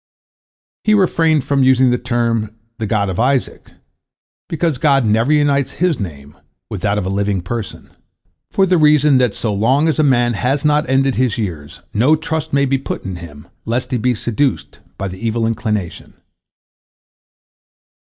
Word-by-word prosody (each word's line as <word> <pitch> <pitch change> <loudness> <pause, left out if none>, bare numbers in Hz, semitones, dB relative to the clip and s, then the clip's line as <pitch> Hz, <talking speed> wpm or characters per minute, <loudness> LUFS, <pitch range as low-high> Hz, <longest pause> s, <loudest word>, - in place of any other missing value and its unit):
He 215 - +3
refrained 165 -6 +2
from 140 0 0
using 130 -1 +4
the 125 - 0
term 115 -3 -1 0.2
"the 110 - -2
God 100 -2 0
of 95 0 -4
Isaac," 130 +2 -1 0.8
because 165 -4 -1
God 140 -4 +3
never 110 +6 +2
unites 145 -2 +2
His 175 -4 0
name 75 -7 -7 0.4
with 100 - -5
that 105 0 0
of 100 - -2
a - - -2
living 100 0 -1
person, 110 +3 -6 0.6
for 195 - +2
the 185 -2 +2
reason 150 -3 +4
that 125 -5 +1
so 110 -3 -2
long 130 +10 +2
as 155 -3 0
a - - +4
man 120 -4 +2
has 130 +6 -1
not 150 -2 +2
ended 135 0 +2
his 125 -4 0
years, 85 -6 -5
no 130 +9 +3
trust 160 0 -4
may 140 0 +2
be 135 0 0
put - - -5
in 95 -2 -5
him, 75 -4 -12 0.2
lest 120 +5 -3
he 125 - 0
be 125 +2 +1
seduced 120 +5 -2 0.2
by 95 - -3
the 95 0 -8
evil 115 0 0
inclination. 110 -5 -3
125 Hz, 170 wpm, -17 LUFS, 105-140 Hz, 0.8 s, using